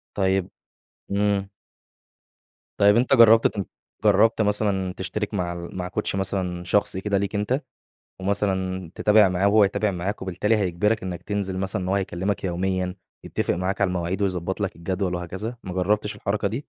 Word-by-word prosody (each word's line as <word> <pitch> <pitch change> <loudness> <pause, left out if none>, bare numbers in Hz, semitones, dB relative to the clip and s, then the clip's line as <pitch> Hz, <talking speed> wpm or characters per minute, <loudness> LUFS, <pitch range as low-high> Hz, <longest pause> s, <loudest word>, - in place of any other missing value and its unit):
طيب 95 -1 +1 0.6
إمم. 100 -1 +1 1.3
طيب 100 +1 +6
أنتَ 125 +3 +2
جربت 115 -2 +7
ت 100 -2 -4 0.4
جربت 115 0 +4
مثلًا 100 -3 0
تشترك 95 +4 -4
مع 90 -3 -1
مع 90 +1 -5
كوتش 95 +1 -2
مثلًا 95 -2 -2
شخصي 95 +1 +1
كده 100 -1 0
ليك 100 +2 -2
أنتَ؟ 110 +7 0 0.6
ومثلًا 95 -3 -1
تتابع 105 -2 +5
معاه 90 +2 +1
وهو 105 0 +5
يتابع 105 +1 0
معاك، 95 +3 -3
وبالتالي 95 +4 +1
هيجبرك 105 +3 0
إنك 90 -2 -5
تنزل 100 -2 -3
مثلًا 95 +1 -2
إن 90 - -3
هو 95 - +1
هيكلمك 100 0 -2
يوميًا 90 0 -1 0.3
يتفق - - -1
معاك 95 +3 -2
على 100 - +3
المواعيد 90 +2 -2
ويضبط 95 0 -1
لك 100 -2 -2
الجدول 90 +2 -2
وهكذا، 95 +7 -5
ما 95 - -5
جربتش 105 +3 0
الحركة 100 0 -1
دي؟ 110 - -4
95 Hz, 160 wpm, -24 LUFS, 90-105 Hz, 1.3 s, جربت